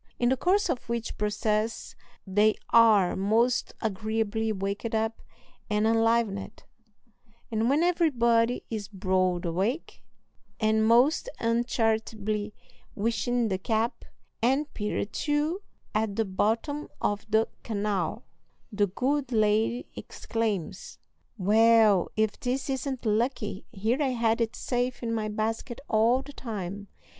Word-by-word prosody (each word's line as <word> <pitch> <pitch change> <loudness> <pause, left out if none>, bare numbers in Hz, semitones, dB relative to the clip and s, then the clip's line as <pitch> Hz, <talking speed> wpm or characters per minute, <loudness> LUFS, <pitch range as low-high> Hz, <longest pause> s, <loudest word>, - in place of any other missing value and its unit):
In 240 - +2
the 260 - +3
course 375 +9 +2
of 260 -7 -3
which 235 -1 -3
process 210 +2 -1 0.3
they 210 +2 +3 0.2
are 215 -6 +5
most 225 +5 +1
agreeably 220 +1 -1
waked 200 +3 -3
up 220 +1 -1 0.5
and 210 0 +1
enlivened; 225 -3 +1 0.9
and 225 +1 +1
when 295 +4 +3
everybody 245 -9 +2
is 210 -3 -3
broad 185 -3 0
awake, 195 - -2 0.6
and 220 0 +2
most 255 - +4
uncharitably 225 -3 0 0.4
wishing 230 +2 0
the 190 -1 -1
cap, 220 +3 -1 0.4
and 270 +5 +1
Peter 210 -1 -2
too, 300 - -1 0.3
at 215 -1 0
the 225 - +1
bottom 225 +10 -1
of 205 0 -1
the 220 +1 +3
canal, 205 -1 -2 0.5
the 205 -1 +1
good 265 +7 -1
lady 220 +2 +2
exclaims, 210 -6 -4 0.4
"Well, 215 -1 +4
if 215 -1 0
this 260 +2 -2
isn't 265 -1 -3
lucky; 220 -2 -1
here 225 +6 -1
I 265 -3 +1
had 230 0 +2
it 225 -1 -1
safe 245 0 -2
in 230 -1 -1
my 215 -1 -1
basket 225 +3 -3
all 230 +4 +3
the 285 - -11
time!" 205 -5 -6
225 Hz, 120 wpm, -27 LUFS, 210-240 Hz, 0.9 s, are